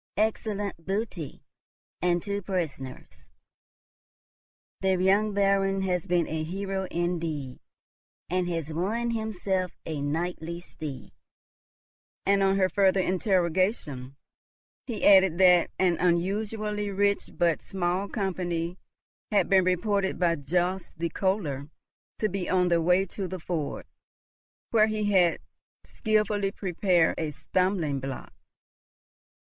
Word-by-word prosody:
Excellent 205 -4 -1
booty, 195 -5 -4 0.6
and 175 0 +1
two 200 0 -2
prisoners! 150 - -5 1.5
The 190 -1 +2
young 195 +4 +3
Baron 195 -1 +2
has 180 -1 -1
been 175 -2 +2
a 160 0 -2
hero 190 +3 -3
indeed, 165 -6 -2 0.7
and 180 0 0
has 165 -2 -3
won 220 +8 -1
himself 195 -5 -2
a 155 -3 -3
knightly 170 +3 -2
steed." 150 -6 -8 1.1
And, 200 0 +3
on 195 0 +3
her 190 -1 +4
further 195 0 +3
interrogation, 180 - 0 0.7
he 230 -5 -2
added, 190 -4 +6
that 180 -2 +6
an 180 -3 +2
unusually 205 +4 0
rich 200 +1 +1
but 170 -3 +2
small 185 +1 -1
company 180 -4 -2 0.5
had 200 -4 +3
been 190 -1 +5
reported 190 +2 +1
by 170 -2 +2
Jobst 180 +6 -1
the 170 +1 -1
Kohler 160 -7 -1 0.5
to 215 - +1
be 190 -2 -3
on 180 -1 +3
the 170 -1 +3
way 180 +3 +3
to 195 0 -5
the 185 - -5
ford, 160 -3 -3 0.9
where 215 -2 +5
he 215 -1 -1
had 180 -4 +4 0.5
skilfully 210 -2 0
prepared 180 -3 +1
a 160 -2 -1
stumbling 170 -1 0
block. 135 -1 -6
185 Hz, 115 wpm, -27 LUFS, 170-200 Hz, 1.5 s, added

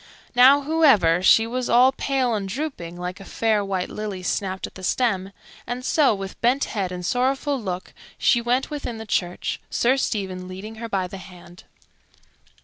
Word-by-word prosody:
Now, 265 +3 +7
however, 275 - +4
she 225 +4 +6
was 250 +2 -3
all 250 +3 +6
pale 265 -2 0
and 200 -3 -2
drooping, 200 - -5
like 180 +2 -5
a - - -10
fair 215 +1 0
white 190 -2 -2
lily 205 -3 -5
snapped 190 +1 -2
at - - -10
the 185 - -11
stem; 195 -2 0 0.4
and 250 +1 -4
so, 285 -8 +3
with 195 0 -8
bent 250 +4 +2
head 195 -4 -3
and 180 -1 -5
sorrowful 265 - 0
look, 185 -3 -5 0.2
she 240 - +3
went 250 +5 0
within 285 -6 -4
the 220 - -7
church, 180 -4 -2
Sir 255 +3 +2
Stephen 190 -7 -3
leading 200 +4 -8
her 230 - -5
by 195 -3 0
the 190 +2 -8
hand. 180 -1 -14
215 Hz, 175 wpm, -23 LUFS, 185-255 Hz, 0.4 s, Now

